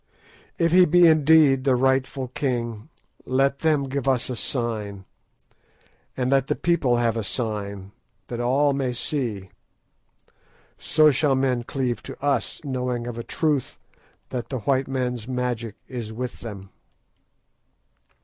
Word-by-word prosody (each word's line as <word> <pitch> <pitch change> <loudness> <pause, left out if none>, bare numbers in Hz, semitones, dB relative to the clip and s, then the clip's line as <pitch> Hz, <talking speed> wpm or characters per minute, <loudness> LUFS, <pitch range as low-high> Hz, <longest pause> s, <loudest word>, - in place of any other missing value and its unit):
If 165 -1 +2
he 180 +1 +7
be 175 +1 +5
indeed 155 -4 +5
the 130 -2 +3
rightful 130 0 0
king, 120 -2 -3 0.3
let 135 +2 +1
them 155 -3 +2
give 135 0 -3
us 130 -1 +1
a - - -3
sign, 110 -6 -3 1.1
and 130 0 0
let 135 -1 +3
the - - 0
people 155 -8 +1
have 115 -2 +1
a 115 - -1
sign, 100 -2 -4 0.4
that 120 - -5
all 135 +4 +2
may 135 -2 -1
see. 115 -7 -3 1.3
So 155 -1 +4
shall 140 0 +2
men 130 -2 +1
cleave 125 0 -2
to - - -9
us, 140 -3 -1
knowing 125 -3 -2
of 120 -1 -5
a - - -4
truth 150 -2 -1 0.5
that 125 -2 -4
the 130 -4 -3
white 135 +3 +1
man's 125 -3 -3
magic 125 -4 -3
is 120 -4 -6
with 125 +2 -5
them." 100 -4 -9
130 Hz, 140 wpm, -24 LUFS, 120-140 Hz, 1.3 s, he